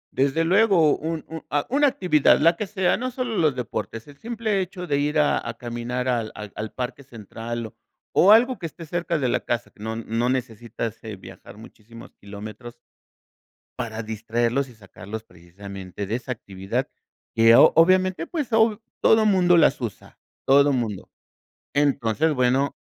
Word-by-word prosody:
Desde 140 +4 +2
luego, 185 -4 +4
un 160 0 -4
un 160 0 -8
ah, 145 0 0
una 290 +1 +4
actividad, 180 - +3
la 165 +3 +4
que 210 - -4
sea, 190 -2 +1
no 255 +2 -3
solo 250 -3 -4
los 155 -7 +2
deportes, 115 -1 -5
el 145 - -13
simple 220 -4 -1
hecho 180 0 -6
de 140 -4 0
ir 150 +2 0
a 150 -1 +3
a 115 - -6
caminar 120 +2 -4
al 120 -3 -1
al 105 -1 -8
al 110 0 -5
parque 125 +2 -5
central 115 -1 -7
o 110 - -11 0.4
o 195 - +6
algo 245 +3 +5
que 165 - -4
esté 165 +1 -11
cerca 170 +1 -2
de 135 -4 0
la - - +1
casa, 120 -3 -3
no 110 +2 -5
no 115 +2 -1
necesitas, 115 -3 -4
eh, 110 -2 -6
viajar 95 +1 -13
muchísimos 115 +1 -14
kilómetros 105 +4 -9 1.0
para 115 -2 -4
distraerlos 115 +4 -1
y 125 - -15
sacarlos 105 +1 -9
precisamente 95 +2 -9
de 110 +4 -1
esa 125 +1 -5
actividad 95 -4 -4 0.5
que 115 0 +6
o-obviamente, 185 +2 +4
pues 295 -8 -4
hoy 220 -1 +3 0.2
todo 220 -1 +5
mundo 180 -4 +4
las 155 -4 +4
usa, 115 -5 -7 0.3
todo 140 +1 +5
mundo. 110 -6 -3 0.7
Entonces, 145 +1 +1
bueno 130 +2 +1
130 Hz, 165 wpm, -23 LUFS, 115-170 Hz, 1.0 s, o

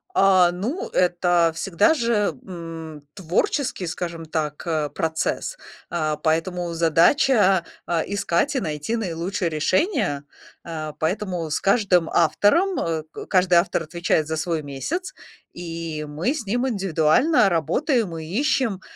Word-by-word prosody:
А, 185 -3 +5
ну, 235 - -4
это 175 -2 +2
всегда 195 - +2
же, 230 -7 +1
м, 165 -4 -8
творческий, 190 - -1
скажем 170 -1 -5
так, 155 -2 -3
э, 155 -3 -1
процесс, 160 - -2 0.4
а, 155 -3 -1
поэтому 170 +3 -1
задача, 185 - +4 0.2
а, 170 -2 0
искать 200 - 0
и - - +2
найти 155 - -3
наилучшее 185 -2 -2
решение. 155 - 0 0.4
А, 155 -2 -5
поэтому 175 -1 -2
с - - 0
каждым 195 -5 +3
автором 205 - +3
э, 160 -2 -2 0.3
каждый 180 -2 +3
автор 175 -1 -1
отвечает 165 -1 0
за 160 - -2
свой 160 0 -2
месяц, 210 - -4 0.4
и 165 -3 -5
мы 160 - -1
с 290 -8 -5
ним 245 +6 0
индивидуально 195 - +3
работаем 195 - 0
и 160 - -6
ищем, 225 - 0
175 Hz, 125 wpm, -23 LUFS, 160-205 Hz, 0.4 s, А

